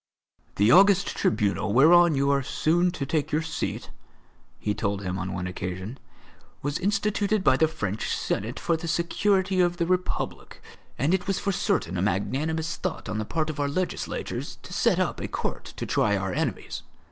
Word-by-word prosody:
"The 105 +3 +4
august 195 +3 +6
tribunal 105 -2 0
whereon 165 +5 +6
you 140 +1 +2
are 140 0 +2
soon 170 +6 +1
to 175 -6 -4
take 150 +1 -1
your 155 +2 +1
seat," 155 -1 -4 0.7
he 105 - -1
told 100 -1 -2
him 95 0 -3
on 95 +1 -3
one 90 - -3
occasion, 95 +6 -5 0.6
"was 145 +1 -1
instituted 205 +1 +1
by 130 - +5
the 160 +4 +3
French 110 - -3
Senate 115 +6 -2
for 170 -4 +1
the 165 +1 -5
security 190 +3 +1
of 175 0 +1
the 170 - +1
Republic; 180 +1 -2 0.4
and 145 +7 +1
it 190 -1 0
was 195 -1 +1
for 200 - -1
certain 90 - 0
a - - 0
magnanimous 145 - -1
thought 185 -3 -4
on 110 0 -2
the 110 - -2
part 155 +5 -1
of 150 - -9
our 145 0 +1
legislators 180 +5 -3
to - - -9
set - - +2
up - - 0
a - - -3
court - - -4
to - - -3
try 105 -1 +2
our 95 -1 -2
enemies. - - -3
155 Hz, 180 wpm, -26 LUFS, 105-175 Hz, 0.7 s, august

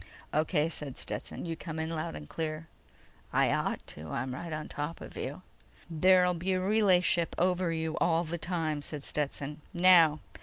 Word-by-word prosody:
"O.K.," 155 0 +2
said 150 -5 -5
Stetson. - - -4
"You 165 -1 -3
come 160 -1 -6
in 160 +1 -2
loud 155 - -3
and 75 0 -8
clear." 155 - -4 0.7
"I - - +3
ought - - -1
to. 75 +1 -9
I'm 125 +7 -3
right 170 +5 -6
on 155 0 -4
top 150 +3 -4
of - - -10
you!" - - -5 0.5
"There'll 180 +2 +5
be 180 +2 -1
a 185 - +1
relay 195 -1 +4
ship 170 -1 +1
over 180 -1 +2
you 160 -1 -2
all 165 0 +3
the 170 +1 -4
time," 160 -3 -1
said 145 -1 -4
Stetson. 145 0 -2
"Now 170 -4 +6
165 Hz, 180 wpm, -30 LUFS, 150-175 Hz, 0.7 s, Now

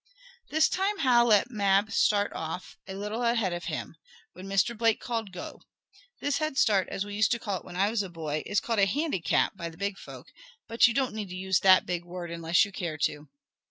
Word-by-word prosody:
This 315 +1 +3
time 395 +2 -1
Hal 245 -6 +4
let 225 +2 +3
Mab 200 -1 +2
start 205 -2 +2
off 165 +3 -6
a 190 - -6
little 210 +4 -4
ahead 230 -6 +1
of 175 - -5
him, - - -5 0.4
when 185 +2 -10
Mr. 195 +4 +1
Blake 225 0 +2
called 225 -4 -4
"Go!" 180 0 -8 0.6
This 285 0 -1
"head 310 -3 -2
start," 200 -7 +3
as 195 - -3
we 205 - -8
used 215 +2 +2
to - - -1
call 205 -5 -3
it - - -19
when 175 - -10
I 200 +3 +2
was 225 -2 0
a 195 - -5
boy, 155 -3 -4
is 205 - +1
called 230 -3 -2
a 195 - +5
"handicap" 195 - 0
by 170 - -5
the 165 - -15
big 200 +1 -3
folk, - - -11 0.4
but 230 +1 +5
you 235 - -2
don't 265 -4 0
need 210 -3 -5
to 180 - -7
use 190 0 +1
that 185 -1 +6
big 175 -1 -3
word, 175 -1 -7
unless 170 +1 +2
you 200 - -10
care 170 -5 -4
to. 150 0 -2
200 Hz, 230 wpm, -28 LUFS, 180-230 Hz, 0.6 s, that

